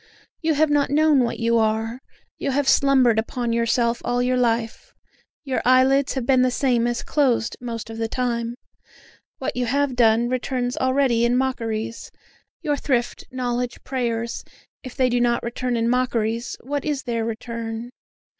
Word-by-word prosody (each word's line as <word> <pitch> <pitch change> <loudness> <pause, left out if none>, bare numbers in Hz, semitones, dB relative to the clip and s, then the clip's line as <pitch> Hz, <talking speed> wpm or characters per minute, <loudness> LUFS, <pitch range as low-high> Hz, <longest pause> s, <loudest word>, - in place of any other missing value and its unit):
You 320 -2 +1
have 305 +1 +3
not 290 -1 +2
known 300 0 +4
what 240 -2 0
you 230 0 +2
are 220 +2 0 0.4
you - - -2
have 275 +1 0
slumbered 260 -6 +4
upon 235 +1 -2
yourself 235 0 +1
all 245 0 0
your 250 +1 +1
life; 230 -2 -1 0.5
Your 270 -3 -1
eyelids 260 +2 +4
have 260 -3 -3
been 260 0 +4
the 255 - +3
same 245 -2 +1
as 240 0 -2
closed 255 -6 +1
most 230 -3 -5
of 225 - -7
the 225 - 0
time; 235 -1 -2 0.8
What - - -3
you 245 -1 -1
have 280 +1 0
done 230 0 +4
returns 250 0 -2
already 260 -3 +2
in 240 +1 +3
mockeries; 230 -3 -2 0.5
Your 295 -3 0
thrift, 245 -4 -1
knowledge, 245 -1 -3
prayers, 235 -3 -2 0.4
if 255 -2 -9
they 260 -2 +3
do 245 0 +1
not 240 -1 +1
return 240 +1 -2
in 230 0 +1
mockeries, 235 -2 0
what 285 +2 -3
is 290 -3 -2
their 230 -2 -2
return? 230 +1 -5
245 Hz, 165 wpm, -23 LUFS, 230-260 Hz, 0.8 s, known